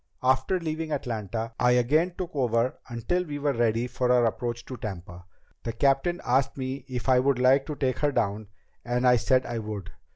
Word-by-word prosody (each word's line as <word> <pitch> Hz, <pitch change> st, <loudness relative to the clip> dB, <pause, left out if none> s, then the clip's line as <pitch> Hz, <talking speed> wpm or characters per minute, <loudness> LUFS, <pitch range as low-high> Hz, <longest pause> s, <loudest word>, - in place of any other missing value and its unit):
After 130 Hz, +8 st, +2 dB
leaving 160 Hz, -1 st, -3 dB
Atlanta, 115 Hz, -4 st, -3 dB
I 125 Hz, 0 st, +4 dB
again 155 Hz, +9 st, +2 dB
took 180 Hz, -3 st, -5 dB
over 120 Hz, -2 st, +1 dB
until 120 Hz, +10 st, -1 dB
we 150 Hz, -4 st, -5 dB
were 145 Hz, 0 st, 0 dB
ready 115 Hz, 0 st, +1 dB
for 125 Hz, 0 st, 0 dB
our 125 Hz, -1 st, +4 dB
approach 120 Hz, +1 st, -2 dB
to 130 Hz, -, -7 dB
Tampa. 90 Hz, -4 st, -7 dB, 0.4 s
The 115 Hz, -, -4 dB
captain 140 Hz, +8 st, +2 dB
asked 130 Hz, +3 st, +1 dB
me 130 Hz, +1 st, -4 dB
if 125 Hz, -1 st, -5 dB
I 130 Hz, -1 st, +5 dB
would 135 Hz, 0 st, +2 dB
like 130 Hz, +2 st, +4 dB
to 150 Hz, -, -4 dB
take 130 Hz, -3 st, -1 dB
her 145 Hz, -1 st, +2 dB
down, 110 Hz, -4 st, -1 dB, 0.4 s
and 125 Hz, +1 st, 0 dB
I 125 Hz, 0 st, +6 dB
said 130 Hz, +2 st, +2 dB
I 120 Hz, -1 st, -3 dB
would. 105 Hz, -4 st, -6 dB
125 Hz, 195 wpm, -27 LUFS, 115-140 Hz, 0.4 s, I